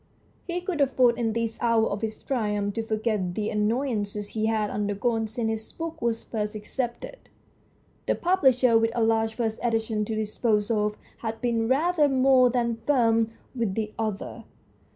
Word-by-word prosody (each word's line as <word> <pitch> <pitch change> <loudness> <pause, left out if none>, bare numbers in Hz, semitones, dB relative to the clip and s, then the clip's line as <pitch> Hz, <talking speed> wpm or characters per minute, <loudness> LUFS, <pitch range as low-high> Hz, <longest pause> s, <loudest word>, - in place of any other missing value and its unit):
He 355 0 -2
could 355 -4 -2
afford 250 -3 +3
in 225 -2 0
this 230 0 -2
hour 230 -2 +3
of 200 0 -3
his 220 -1 -4
triumph 210 -5 -1
to 225 - -1
forget 215 -5 -1
the 215 0 -1
annoyances 210 -2 -1
he 220 0 -1
had 215 -2 0
undergone 215 +2 -1
since 225 +1 -3
his 220 0 -4
book 330 0 -6
was 230 -1 -1
first 210 -1 -3
accepted. 240 - -4 0.9
The - - +2
pub 370 +2 +1
lisher, 250 -3 +5
with 225 0 +2
a 235 - +2
large 225 0 +1
first 225 -2 -2
edition 225 -2 0
to 220 - -3
dispose 215 0 0
of, 210 -1 +1 0.2
had 225 -1 -4
been 230 -2 0
rather 300 +3 +3
more 260 -1 +5
than 235 -2 0
firm 230 -5 +3 0.3
with 230 -7 -1
the 215 -1 -2
author. 220 +1 -4
225 Hz, 170 wpm, -26 LUFS, 215-245 Hz, 0.9 s, lisher